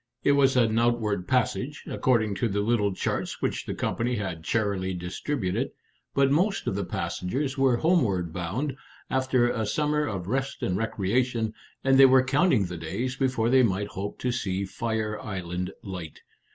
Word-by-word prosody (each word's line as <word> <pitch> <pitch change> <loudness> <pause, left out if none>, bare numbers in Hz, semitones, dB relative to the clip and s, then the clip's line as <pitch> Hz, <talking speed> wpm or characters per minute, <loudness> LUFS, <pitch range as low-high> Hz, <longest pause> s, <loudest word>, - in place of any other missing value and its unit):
It - - +4
was 135 -2 +4
an 115 -2 +3
outward 110 -5 +1
passage, 130 +3 0
according 110 -5 +1
to 120 - +3
the 100 -1 -1
little 105 -2 +2
charts 95 - -2
which - - -2
the - - -3
company 120 +1 -1
had 95 -6 -4
charily 100 -3 0
distributed, 90 +4 -2 0.5
but 135 0 +4
most 190 +7 +1
of - - 0
the 100 +1 -1
passengers 130 +9 -2
were 135 -3 +3
homeward 105 - +1
bound, 115 - -2 0.4
after 130 -2 +2
a 110 - -1
summer 150 +6 0
of 95 -7 -4
rest 135 +6 -2
and 90 - 0
recreation, 115 +2 0 0.3
and 135 0 +4
they 135 - +10
were 130 0 +6
counting 130 - +3
the 90 -1 -6
days 100 +11 -3
before 125 -4 +1
they 130 0 +6
might 105 -3 +1
hope 100 +1 -5
to 125 - 0
see 100 -5 -2
Fire 110 +1 -2
Island 90 -2 -4
Light. 90 -5 -7
115 Hz, 165 wpm, -27 LUFS, 95-130 Hz, 0.5 s, they